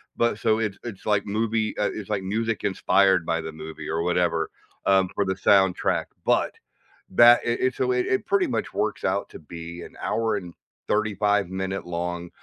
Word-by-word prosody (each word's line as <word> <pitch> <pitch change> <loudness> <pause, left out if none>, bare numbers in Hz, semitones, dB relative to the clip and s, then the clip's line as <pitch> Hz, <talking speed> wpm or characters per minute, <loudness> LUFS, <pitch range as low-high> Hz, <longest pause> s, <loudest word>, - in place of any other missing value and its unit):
but 120 -2 +1
so 110 -1 +2
it's 105 -3 -2
it's 105 -5 -8
like 105 -2 +1
movie 110 +1 -1
uh, 105 - +1
it's 105 -3 -7
like 100 -3 -1
music 110 +3 -2
inspired 95 -2 +3
by 85 0 0
the 80 0 -6
movie 80 0 -8
or 80 +1 -1
whatever, 85 -2 +1 0.4
um, 95 -1 +4
for 100 - +1
the 95 0 -1
soundtrack, 95 -1 +3 0.2
but - - +2 0.6
that 120 +5 +7
it 120 0 -1
it's 130 0 0
a 130 - +2
way 125 0 +1
it 130 - 0
pretty 200 -2 +2
much 115 -3 -3
works - - -2
out - - 0
to - - -11
be 85 +2 -9
an - - -11
hour 115 -2 0
and 90 -4 -8 0.3
thirty-five-minute-long 95 -4 -1
100 Hz, 180 wpm, -25 LUFS, 90-110 Hz, 0.6 s, that